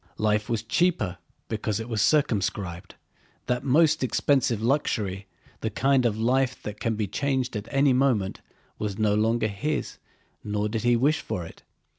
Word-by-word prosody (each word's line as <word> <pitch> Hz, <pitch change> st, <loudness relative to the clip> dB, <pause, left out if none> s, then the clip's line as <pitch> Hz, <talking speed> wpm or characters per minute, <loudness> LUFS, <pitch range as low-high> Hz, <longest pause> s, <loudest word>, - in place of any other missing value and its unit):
Life 105 Hz, +1 st, +1 dB
was 115 Hz, -2 st, -1 dB
cheaper 115 Hz, -, 0 dB, 0.3 s
because 110 Hz, -1 st, -2 dB
it 115 Hz, -, -5 dB
was 110 Hz, -4 st, -1 dB
circumscribed: 100 Hz, -, 0 dB, 0.5 s
that 125 Hz, 0 st, -1 dB
most 155 Hz, +2 st, +3 dB
expensive 130 Hz, -3 st, +2 dB
luxury, 105 Hz, -6 st, -1 dB, 0.3 s
the 110 Hz, -, -2 dB
kind 130 Hz, +3 st, +2 dB
of 110 Hz, -2 st, -2 dB
life 130 Hz, +3 st, +1 dB
that 105 Hz, 0 st, -6 dB
can 115 Hz, -2 st, -1 dB
be 105 Hz, 0 st, -1 dB
changed 130 Hz, +4 st, -1 dB
at 105 Hz, +1 st, -4 dB
any 135 Hz, 0 st, +3 dB
moment, 125 Hz, -7 st, +1 dB, 0.4 s
was 105 Hz, -2 st, -3 dB
no 110 Hz, -2 st, +2 dB
longer 110 Hz, +2 st, +2 dB
his 110 Hz, +10 st, -3 dB, 0.4 s
nor 105 Hz, 0 st, -1 dB
did 110 Hz, +1 st, -2 dB
he 120 Hz, 0 st, +3 dB
wish 140 Hz, +6 st, +2 dB
for 90 Hz, -, -4 dB
it. -, -, -13 dB
115 Hz, 160 wpm, -26 LUFS, 105-130 Hz, 0.5 s, most